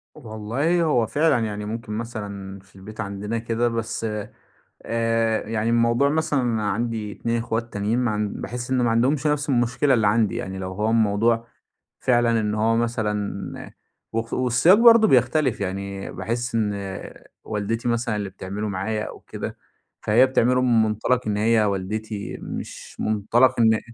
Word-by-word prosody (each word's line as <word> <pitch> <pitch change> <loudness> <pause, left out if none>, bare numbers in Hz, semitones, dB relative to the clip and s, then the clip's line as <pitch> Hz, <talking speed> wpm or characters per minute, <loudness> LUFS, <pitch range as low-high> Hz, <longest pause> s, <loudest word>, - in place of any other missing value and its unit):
والله 130 +7 -1
هو 125 -8 +2
فعلًا. 150 -1 +2
يعني 105 -1 -4
ممكن 110 0 -5
مثلًا 100 -4 -6
في 95 0 -24
البيت 105 +3 -8
عندنا 100 +2 -4
كده، 115 +1 0
بس 115 -1 -3 0.8
آآ 115 -1 0
يعني 115 0 0
الموضوع 115 +3 +3
مثلًا 150 -2 +1
أنا 110 -4 0
عندي 110 -1 -2
2 115 0 -2
إخوات 115 0 -3
تانيين 105 +4 0
ما 125 -3 +1
عن 105 0 -1
باحس 120 +1 -5
إنه 130 -2 +2
ما 120 - +2
عندهمش 130 +6 +2
نفس 150 -1 0
المشكلة 125 +2 +2
اللي 110 -4 +2
عندي. 110 0 +2
يعني 95 0 -5
لو 95 0 -5
هو 105 +3 -1
الموضوع 115 +1 +2 0.5
فعلًا 120 -2 +2
إن 105 -1 -1
هو 110 +1 +2
مثلًا 110 -3 -2 0.4
وخ 115 0 -2
والسياق 130 +9 +4
برضه 230 -1 +7
بيختلف. 130 - +2
يعني 100 +1 -4
باحس 115 +5 -3
إن 105 -2 +1 0.7
والدتي 110 +3 -3
مثلًا 115 -1 0
اللي 100 -2 -3
بتعمله 100 +2 -5
معايا 105 +3 -2
أو - - -8
كده، - - -7 0.4
فهي 115 +5 +5
بتعمله 125 -1 +2
من 120 -3 +4
مُنطَلَق 110 +3 0
إن 105 -1 0
هي 110 +1 +3
والدتي 105 +2 -3
مش - - -7
مُنطَلَق 110 +4 +2
إن 110 -1 +5
أ 110 - 0
115 Hz, 160 wpm, -23 LUFS, 105-120 Hz, 0.8 s, برضه